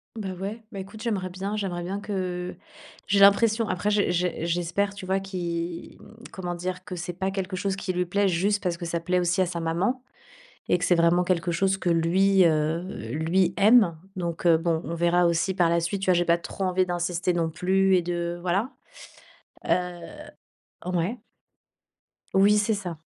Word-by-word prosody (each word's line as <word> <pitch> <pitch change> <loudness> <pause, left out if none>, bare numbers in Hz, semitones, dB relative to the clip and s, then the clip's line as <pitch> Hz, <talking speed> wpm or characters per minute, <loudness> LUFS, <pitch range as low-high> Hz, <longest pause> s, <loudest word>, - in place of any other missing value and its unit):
Ben 195 -4 -4
ouais, 220 +4 -5
ben 195 - -6
écoute, 215 +3 -11
j'aimerais 195 -6 -2
bien 195 +3 -4
j'aimerais 180 -4 -3
bien 195 +3 -3
que 180 -4 -4 0.5
j'ai 200 0 +2
l'impression. 215 +3 +5
Après, 205 +4 0
j'e 205 -3 +2
j'e 175 -2 -1
j'espère 175 +4 -1
tu 190 - -8
vois 190 +1 +1
qu'il, 175 -3 -5
mmh - - -15 0.2
comment 175 -2 -5
dire? 180 +1 -5
Que 180 - -7
c'est 175 +1 -5
pas 190 +2 -2
quelque 190 -1 -3
chose 195 +1 -1
qui 190 -1 -3
lui 180 0 0
plaît 200 +3 +1
juste 200 +4 +1
parce 175 -2 0
que 170 - -6
ça 170 0 -2
plaît 180 +2 0
aussi 175 +2 0
à - - +3
sa 170 -1 -4
maman 180 +11 -1 0.7
et - - +4
que - - -2
c'est 175 - +4
vraiment 170 +1 +4
quelque 175 -1 0
chose 195 +2 +1
que 185 - -3
lui, 185 +3 +3
heu, 160 +1 +1 0.3
lui, 170 +4 +1
aime, 205 -5 +5 0.2
donc 170 -1 -4
heu, 165 -1 +6
bon, 165 -1 0
on 165 - -4
verra 175 +1 +3
aussi 170 +3 +1
par 175 -3 +3
la 170 0 +2
suite, 180 +4 -2
tu - - -2
vois, - - +5
j'ai 175 0 +2 0.2
trop 195 - -5
envie 185 0 +1
d'insister 175 0 -1
non 165 -1 0
plus 190 +3 +2
et 175 - +2
de 175 0 -3
voilà. 195 +9 0 1.0
Heu. - - -1 1.2
Ouais. 180 +7 -1 1.2
Oui, 200 +2 +5
c'est 210 +1 +2
ça. 175 -5 -6
180 Hz, 190 wpm, -25 LUFS, 170-195 Hz, 1.2 s, heu